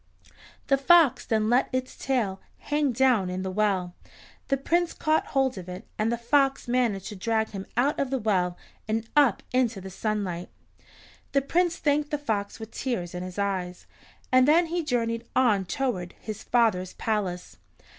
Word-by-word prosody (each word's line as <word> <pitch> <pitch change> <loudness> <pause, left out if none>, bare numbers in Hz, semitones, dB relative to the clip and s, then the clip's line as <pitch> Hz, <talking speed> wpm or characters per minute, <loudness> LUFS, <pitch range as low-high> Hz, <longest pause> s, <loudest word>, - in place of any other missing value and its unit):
The 275 -1 +2
fox 325 -2 +5
then 215 -1 +1
let 245 +3 +3
its 255 0 -3
tail 225 -8 -1 0.2
hang 295 -2 0
down 240 -6 +3
in 185 +1 -3
the 190 - -3
well, 190 -3 0 0.5
the 275 - +1
Prince 340 +5 0
caught 310 0 +1
hold 265 -6 0
of 180 0 -9
it, 180 +1 -7
and 220 +2 +1
the 235 - 0
fox 270 +3 +1
managed 240 -6 +1
to 210 - -7
drag 220 +3 0
him 195 -2 -7
out 275 +5 +2
of 275 - 0
the 270 - 0
well 185 -6 0 0.3
and 225 +1 -1
up 280 -8 +4
into 245 -5 +1
the 190 0 -9
sunlight. 190 -4 -3 0.8
The 275 -1 +3
Prince 340 +3 +1
thanked 290 0 +1
the 295 - -1
fox 215 -9 -3
with 220 0 -8
tears 185 -10 -3
in 180 - -4
his 185 +1 -7
eyes, 185 -3 -2 0.5
and 255 +1 +5
then 330 +4 +5
he 340 +1 -2
journeyed 230 -4 -1
on 215 -7 +3
toward 185 -4 -2
his 215 -2 -6
father's 215 -7 +1
palace. 195 -5 -3
230 Hz, 175 wpm, -26 LUFS, 195-270 Hz, 0.8 s, fox